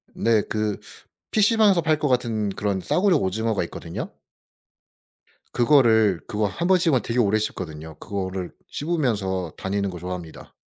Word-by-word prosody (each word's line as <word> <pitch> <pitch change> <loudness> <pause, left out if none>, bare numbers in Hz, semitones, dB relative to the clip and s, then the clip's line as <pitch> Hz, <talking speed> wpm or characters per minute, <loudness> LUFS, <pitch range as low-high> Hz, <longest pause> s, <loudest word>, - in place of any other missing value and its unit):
네 115 -2 +3
그 105 -1 -1 0.5
PC방에서 210 -3 +4
팔 155 -1 +2
것 150 - 0
같은 115 -5 0
그런 100 -1 -2
싸구려 185 - +2
오징어가 110 -1 0
있거든요. - - -6 1.4
그거를 115 - +4
그거 105 -2 -1
1 170 - -3
번 190 0 +5
씹으면 160 -8 +2
되게 120 +1 -2
오래 110 -2 +3
씹거든요. 80 -7 -5
그거를 95 -2 -4 0.2
씹으면서 105 - -1
다니는 100 +1 -2
거 90 -2 -7
좋아합니다. 90 -2 -8
110 Hz, 320 characters per minute, -24 LUFS, 95-145 Hz, 1.4 s, 번